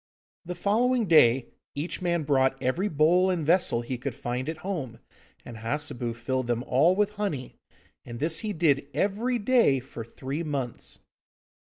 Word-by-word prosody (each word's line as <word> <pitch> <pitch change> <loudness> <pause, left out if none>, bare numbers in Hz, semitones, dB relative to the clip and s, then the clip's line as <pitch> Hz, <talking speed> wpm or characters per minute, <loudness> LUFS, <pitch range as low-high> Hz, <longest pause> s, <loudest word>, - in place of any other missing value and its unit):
The 180 +1 -5
following 230 +6 +1
day 130 -8 +4 0.3
each 150 +6 -3
man 170 -2 0
brought 135 -2 +2
every 135 +10 0
bowl 175 +2 +3
and 175 -5 -1
vessel 165 -8 +3
he 120 +1 -5
could 130 -1 -4
find 125 +3 -3
at 160 +2 -7
home, 145 - -4 0.5
and 120 - -9
Hassebu 120 0 -3
filled 130 +2 -2
them 120 0 -1
all 150 +9 +3
with 210 +1 +1
honey. 145 -11 -3 0.5
And 120 -1 -8
this 160 +3 0
he 215 - -3
did 150 -6 +1
every 215 +9 0
day 230 - +3
for 120 -2 -9
three 135 +6 -5
months. 140 -7 -5
150 Hz, 160 wpm, -27 LUFS, 130-185 Hz, 0.5 s, day